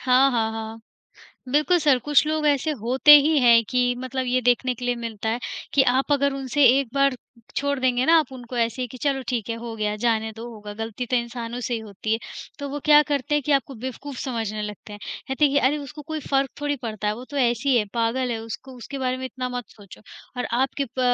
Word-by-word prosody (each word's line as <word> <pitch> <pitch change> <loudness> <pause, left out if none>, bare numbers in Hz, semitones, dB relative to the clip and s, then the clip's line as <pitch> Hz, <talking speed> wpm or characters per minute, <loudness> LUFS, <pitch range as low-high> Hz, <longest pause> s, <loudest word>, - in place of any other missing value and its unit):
हाँ, 260 +2 +4
हाँ, 225 -3 0
हाँ। 225 0 -6 0.7
बिल्कुल 305 +5 +3
सर, 285 -4 +3
कुछ 295 +4 +3
लोग 310 0 0
ऐसे 290 +1 +2
होते 255 +6 +3
ही 300 +2 +3
हैं 235 -2 +6
कि 250 -1 +1
मतलब 260 0 -3
ये 255 +1 +1
देखने 250 +1 +2
के 245 +1 -8
लिए 245 - +1
मिलता 225 -2 -5
है 230 - 0 0.4
कि 280 - +6
आप 270 +3 +1
अगर 280 0 +2
उनसे 275 +1 +1
एक 275 - -1
बार 275 -1 +3 0.4
छोड़ 285 0 0
देंगे 255 -1 +2
ना 330 - +6
आप 305 -5 -1
उनको 245 -1 -8
ऐसे 235 +2 0
कि 245 - -11
चलो 275 -2 0
ठीक 235 -5 -2
है - - -1
हो 230 0 -7
गया 210 -1 -1
जाने 220 0 0
दो 230 +1 -7
होगा 210 -2 -9
गलती 225 +2 -4
तो 250 - +1
इंसानों 235 0 -4
से 245 0 -2
ही 230 - -1
होती 215 0 -5
है, 225 - +2 0.4
तो 285 -1 -5
वो 290 +1 -5
क्या 300 -1 +7
करते 290 +1 0
हैं 295 - +2
कि 300 - +2
आपको 275 0 0
बेवकूफ़ 260 +3 -7
समझने 220 -4 -3
लगते 210 0 -8
हैं। 205 - -8 0.3
कहते 265 +3 +1
हैं 280 - +3
कि 285 - +4
अरे 285 +3 +2
उसको 295 +1 -9
कोई 315 +1 -5
फ़र्क 270 -2 0
थोड़ी 290 0 -1
पड़ता 215 -2 -3
है 210 - 0
वो 245 +3 -9
तो 285 - -6
ऐसी 250 0 +2
है 215 - +3
पागल 240 +2 0
है, 230 - -2
उसको 230 +4 -8
उसके 260 +3 -7
बारे 255 -1 -1
में 260 - -6
इतना 255 0 -5
मत 245 -1 -4
सोचो। 200 -4 -15 0.4
और 250 - -2 0.2
आपके 270 +1 0
प 255 +1 -6
255 Hz, 240 wpm, -24 LUFS, 230-275 Hz, 0.7 s, क्या